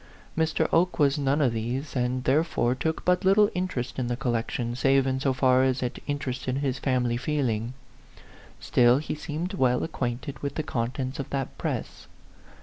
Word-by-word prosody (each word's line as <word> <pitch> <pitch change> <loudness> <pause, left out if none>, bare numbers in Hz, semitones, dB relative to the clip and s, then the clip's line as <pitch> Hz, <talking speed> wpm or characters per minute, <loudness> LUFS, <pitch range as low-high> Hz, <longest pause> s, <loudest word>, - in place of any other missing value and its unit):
Mr. 160 0 +1
Oke 180 +2 +3
was 145 -1 +3
none 140 +2 +1
of 125 -4 +2
these, 125 +6 -3
and 125 0 0
therefore 135 -3 +2
took 160 +5 -2
but 180 +2 +3
little 200 +2 +5
interest 180 -10 -3
in 125 - -1
the 120 0 -2
col 130 -2 -1
lection, 120 +1 -2
save 135 +1 +3
in 130 0 0
so 135 0 +1
far 130 0 +3
as 130 -1 +1
it 125 +1 -4
interested 130 -3 -2
his 135 -2 -1
family 125 -3 +1
feeling. 125 -4 -1 0.8
Still, 120 0 +4
he 150 - -3
seemed 155 +5 -4
well 125 -8 +2
ac 165 - -4
quainted 125 0 -3
with 140 -1 -4
the 155 - -1
contents 130 +1 -3
of 140 - -4
that 135 -2 -3
press. - - -4
130 Hz, 180 wpm, -26 LUFS, 125-150 Hz, 0.8 s, little